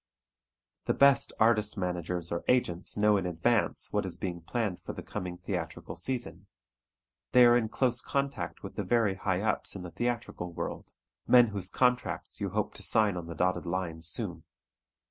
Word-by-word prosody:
The - - +1
best 140 0 +5
artist 110 -1 +3
managers 90 -2 -2
or 85 - -2
agents 95 -9 0
know 105 0 +4
in 95 -2 -1
advance 90 +6 0
what 105 0 +1
is 95 -2 -5
being 90 -3 -4
planned 105 0 -2
for - - -6
the - - -8
coming 90 -1 -5
theatrical 90 -3 -5
season. 130 -2 -4 0.9
They 125 -1 +8
are 120 0 +7
in 115 -3 +1
close 125 -1 +1
contact 140 0 -3
with - - -8
the - - -1
very 115 -5 +2
high 95 -1 -1
ups 110 - 0
in 95 - -6
the 90 - -7
theatrical 120 -7 -3
world, - - -5 0.4
men 120 -2 +7
whose 100 -3 -4
contracts 125 -1 0
you - - -1
hope - - -2
to - - -6
sign 105 -3 +3
on 85 -2 -5
the 85 - -6
dotted 90 0 0
line 85 -2 -3
soon. 85 0 -4
100 Hz, 175 wpm, -30 LUFS, 90-120 Hz, 0.9 s, They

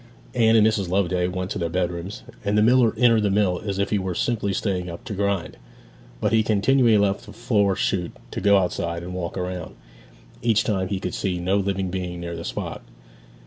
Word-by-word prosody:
Anne 115 -1 +4
and 110 -1 +6
Mrs. 105 -4 +1
Loveday 90 -1 +1
went 90 +1 -4
to 105 - -3
their 85 -1 -1
bedrooms, 90 +2 -3 0.2
and 105 0 +1
the 105 - +5
miller 120 -1 +4
entered 115 -3 +5
the 105 - +1
mill 95 -3 +1
as 100 -2 -3
if 100 - -1
he 105 - +2
were 95 -2 -3
simply 105 -2 0
staying 95 -2 -2
up 85 - -8
to - - -6
grind. 100 -2 -1 0.6
But - - 0
he 110 - +5
continually 110 +2 +3
left 100 +2 0
the 105 - -10
flour 105 -4 +1
shoot 90 -2 -1 0.2
to - - -4
go 100 0 +5
outside 85 -2 -1
and 90 +1 -6
walk 90 -1 -4
round; 90 -2 -4 0.7
each 115 -2 +3
time 95 -3 0
he 95 0 -2
could - - -4
see 95 -2 -1
no 90 +3 0
living 95 -2 -1
being 90 -2 -4
near 85 0 -5
the 85 - -6
spot. - - -5
95 Hz, 210 wpm, -23 LUFS, 90-105 Hz, 0.7 s, and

